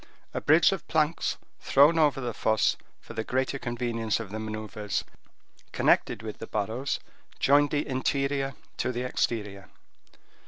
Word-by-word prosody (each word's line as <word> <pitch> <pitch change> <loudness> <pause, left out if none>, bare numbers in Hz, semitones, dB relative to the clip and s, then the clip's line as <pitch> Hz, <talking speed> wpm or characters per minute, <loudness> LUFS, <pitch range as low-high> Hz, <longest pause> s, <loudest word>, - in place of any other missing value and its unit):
A - - -2
bridge 155 +5 +5
of 195 - -4
planks 155 +1 +1 0.2
thrown 150 +4 +5
over 145 -4 +3
the 120 -3 -3
fosses 110 0 +2 0.2
for - - -11
the 110 0 -2
greater 130 +3 -1
convenience 120 -3 -1
of 110 -4 -7
the 110 - -4
maneuvers 110 -1 -3 0.7
connected - - +2
with 110 -2 -6
the 115 - -7
barrows, 110 +6 -2 0.4
joined 145 +1 +4
the 145 0 -1
interior 135 0 0 0.2
to - - 0
the 125 0 -3
exterior. 105 -6 -2
125 Hz, 145 wpm, -28 LUFS, 110-140 Hz, 0.7 s, bridge